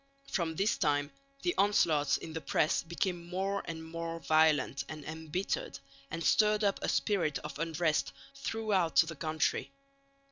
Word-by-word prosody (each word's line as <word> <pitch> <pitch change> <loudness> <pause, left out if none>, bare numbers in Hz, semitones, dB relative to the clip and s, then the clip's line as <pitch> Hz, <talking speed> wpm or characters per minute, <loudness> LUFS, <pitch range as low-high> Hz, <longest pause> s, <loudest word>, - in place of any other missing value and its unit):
From 165 -4 -1
this 200 +6 +1
time 145 -1 +1 0.3
the 355 - +1
onslaughts 155 -8 +3
in 160 - -8
the 160 - -4
press 155 - +1
became 170 +1 -3
more 195 +2 -1
and 160 -1 -5
more 165 0 -5
violent 155 -4 +3
and 155 -2 -7
embittered, 160 +4 -3 0.3
and 165 +1 -4
stirred 210 +2 +4
up 200 -1 +2
a - - -1
spirit 180 -9 +1
of 150 0 -7
unrest 165 -1 0 0.2
throughout 215 -10 0
the 165 0 +4
country. 155 +1 -1
165 Hz, 145 wpm, -32 LUFS, 155-195 Hz, 0.3 s, stirred